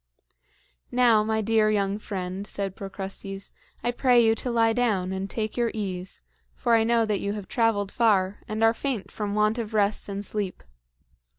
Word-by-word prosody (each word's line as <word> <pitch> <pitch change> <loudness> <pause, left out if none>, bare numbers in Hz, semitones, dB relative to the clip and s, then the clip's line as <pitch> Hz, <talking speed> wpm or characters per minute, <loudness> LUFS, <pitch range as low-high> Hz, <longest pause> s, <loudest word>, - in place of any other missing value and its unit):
"Now, 240 -4 +4
my 220 0 0
dear 220 0 +3
young 200 -1 0
friend," 190 -1 -5
said 195 -2 -4
Procrustes, 195 0 -6 0.3
"I 240 - +1
pray 245 0 +4
you 225 -1 +5
to 245 - -3
lie 225 -1 +3
down 210 -7 +1
and 190 +1 -3
take 215 0 -3
your 240 -1 +1
ease; 185 -3 -4 0.3
for 235 - +1
I 225 -1 +5
know 230 0 +3
that 210 -2 0
you 200 0 -2
have 205 -3 -6
traveled 220 -4 +1
far 205 -4 +2
and 215 +1 -2
are 225 0 +5
faint 245 -4 -3
from 205 -1 -3
want 215 +2 +2
of 220 -1 -4
rest 205 0 +1
and 200 +1 -4
sleep. 200 -2 -3
215 Hz, 180 wpm, -26 LUFS, 195-225 Hz, 0.3 s, you